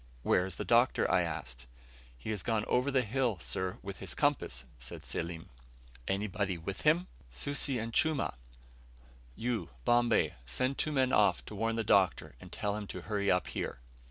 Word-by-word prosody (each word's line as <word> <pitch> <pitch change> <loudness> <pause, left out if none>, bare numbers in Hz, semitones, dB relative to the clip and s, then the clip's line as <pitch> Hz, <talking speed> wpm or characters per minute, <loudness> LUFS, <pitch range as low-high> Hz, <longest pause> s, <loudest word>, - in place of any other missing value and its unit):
"Where 90 - +3
is 95 - -5
the - - -4
Doctor?" 120 +2 +4
I 90 - +4
asked. 65 -8 -5 0.5
"He - - -5
has 105 -3 -2
gone 110 -1 0
over 125 +3 +2
that 130 -2 +2
hill, 120 -2 0
sir, 95 +1 -2
with 100 -1 -6
his - - -3
compass," 65 0 0
said - - -7
Selim. 85 -1 -4 0.6
"Anybody 100 -1 -1
with 95 +4 -5
him?" 160 +4 +4 0.2
"Susi 135 - 0
and 115 0 -4
Chumah." 155 0 +2 1.0
"You, 115 -7 -2 0.2
Bombay, 120 -1 +3
send 130 - -1
two 155 - 0
men 130 -3 +2
off 100 -4 +4
to - - -9
warn 115 +2 0
the 115 - 0
Doctor, 95 -4 +3
and - - -11
tell 100 0 -1
him 105 -1 -5
to - - -6
hurry 100 -2 -1
up 90 -2 +3
here." - - -3
105 Hz, 175 wpm, -32 LUFS, 90-125 Hz, 1.0 s, Doctor